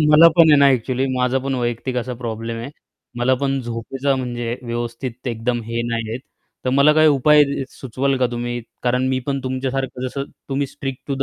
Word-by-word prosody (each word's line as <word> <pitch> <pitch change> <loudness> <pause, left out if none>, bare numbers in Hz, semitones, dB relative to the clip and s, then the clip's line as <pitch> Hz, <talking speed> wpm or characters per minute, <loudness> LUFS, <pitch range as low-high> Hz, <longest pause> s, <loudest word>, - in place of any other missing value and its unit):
मला 165 +2 +9
पण 165 -2 +7
आहे 150 - +7
ना 140 - +6
ॲक्चुअली 130 0 +1
माझा 125 +1 +1
पण 135 +1 -2
वैयक्तिक 120 +1 -2
असा 125 0 -2
प्रॉब्लेम 115 0 -4
आहे. 120 +5 -6 0.5
मला 130 +2 +3
पण 135 0 +1
झोपेचा 125 +3 -2
म्हणजे 120 -2 -3
व्यवस्थित 120 +1 -5
एकदम 120 +1 -1
हे 115 +1 -2
नाही 115 -1 -2
आहे. 115 - -3 0.5
तर 130 - +1
मला 140 +3 +5
काही 155 0 +5
उपाय 150 +1 +5
अ, 140 -1 -1
सुचवाल 135 +2 -2
का 125 - +3
तुम्ही 120 0 -3 0.2
कारण 125 +1 +1
मी 130 0 +1
पण 140 -1 -1
तुमच्यासारखं 130 0 -2
जसं 140 +2 -4 0.2
तुम्ही 140 0 0
स्ट्रिक्ट 135 -1 -6
टू 140 - 0
130 Hz, 190 wpm, -21 LUFS, 120-135 Hz, 0.5 s, मला